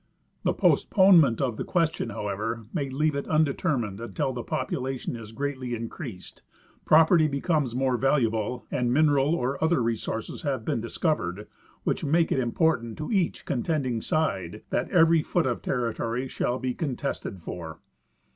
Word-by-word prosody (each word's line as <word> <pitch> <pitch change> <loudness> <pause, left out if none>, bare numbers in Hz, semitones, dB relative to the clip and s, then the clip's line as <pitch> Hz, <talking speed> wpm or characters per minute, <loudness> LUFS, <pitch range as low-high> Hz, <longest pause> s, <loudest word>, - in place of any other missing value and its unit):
The - - 0
postponement 180 - +5
of 125 -5 -1
the - - -2
question, 165 -8 0
however, 110 +2 -3
may 140 -5 -1
leave 150 +3 +1
it 140 - -3
undetermined 140 - 0
until 115 +3 -2
the 125 - -4
population 130 +1 -3
is 110 -2 -9
greatly 130 -1 -3
increased, 115 - -8 0.4
property 160 +1 +6
becomes 140 -3 0
more 130 -1 +1
valuable, 120 -3 0
and 125 -3 0
mineral 145 +1 +3
or 135 0 -2
other 160 -1 +3
resources 115 -1 -3
have 135 -7 -2
been 115 - -1
discovered 105 - -2 0.4
which - - -1
make 165 +3 +2
it - - +2
important 120 -2 0
to 155 - -5
each 190 -6 0
contending 130 -3 -1
side 105 - -1
that - - 0
every 165 -3 +5
foot 170 +2 0
of 125 -3 -1
territory 120 0 -2
shall 125 -1 -1
be 130 -1 -2
con 140 -4 -2
tested 130 -8 -4
for. 80 -2 -7
130 Hz, 150 wpm, -26 LUFS, 115-155 Hz, 0.4 s, property